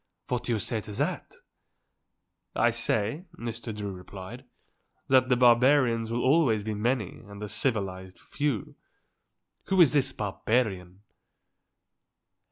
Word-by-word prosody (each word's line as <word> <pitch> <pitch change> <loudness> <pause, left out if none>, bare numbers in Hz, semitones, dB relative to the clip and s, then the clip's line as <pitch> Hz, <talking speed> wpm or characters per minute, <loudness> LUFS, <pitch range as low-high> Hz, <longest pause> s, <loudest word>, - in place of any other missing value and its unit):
What 125 -1 -1
do - - -1
you 115 - +2
say 110 +1 -2
to 105 - -9
that?" - - -3 1.2
"I 120 - +3
say," 115 - -1
Mr. 115 0 -5
Drew 105 -2 -5
replied, 95 +6 -10 0.6
"that 130 -1 +4
the 125 - +4
barbarians 120 -1 +4
will 120 +1 -1
always 130 -7 +3
be 110 +1 -3
many 110 -1 -1
and 100 0 -10
the 105 - -5
civilized 100 -4 -2
few. 140 -8 -3 0.9
Who 190 - +1
is 160 -6 +7
this 140 -2 +2
barbarian?" 100 -3 -2
115 Hz, 125 wpm, -28 LUFS, 105-125 Hz, 1.2 s, is